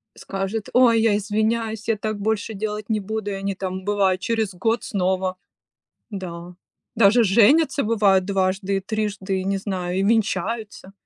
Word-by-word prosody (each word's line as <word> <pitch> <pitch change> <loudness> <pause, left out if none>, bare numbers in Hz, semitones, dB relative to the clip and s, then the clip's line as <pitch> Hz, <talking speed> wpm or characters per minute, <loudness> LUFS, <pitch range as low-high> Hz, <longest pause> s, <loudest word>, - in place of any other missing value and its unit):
скажет: 195 +2 -4
"Ой, 240 -2 +5
я 220 -2 +3
извиняюсь, 220 +1 -1
я 225 - +2
так 215 0 -3
больше 220 +1 -1
делать 210 +1 -4
не 215 - +1
буду". 210 0 -4
И - - -3
они 195 0 -2
там, 185 0 -5
бывает, 195 -2 +1
через 220 -1 -1
год 225 +6 -1
снова. 185 -1 -1 0.7
Да. 180 -3 -7 0.4
Даже 225 +1 +5
женятся, 270 - +4
бывает, 205 -4 +3
дважды, 195 0 0
и - - -1
трижды, 200 -2 -2
не 195 +1 -1
знаю, 185 -2 -3
и - - +1
венчаются. 220 -2 -1
205 Hz, 150 wpm, -22 LUFS, 190-220 Hz, 0.7 s, Ой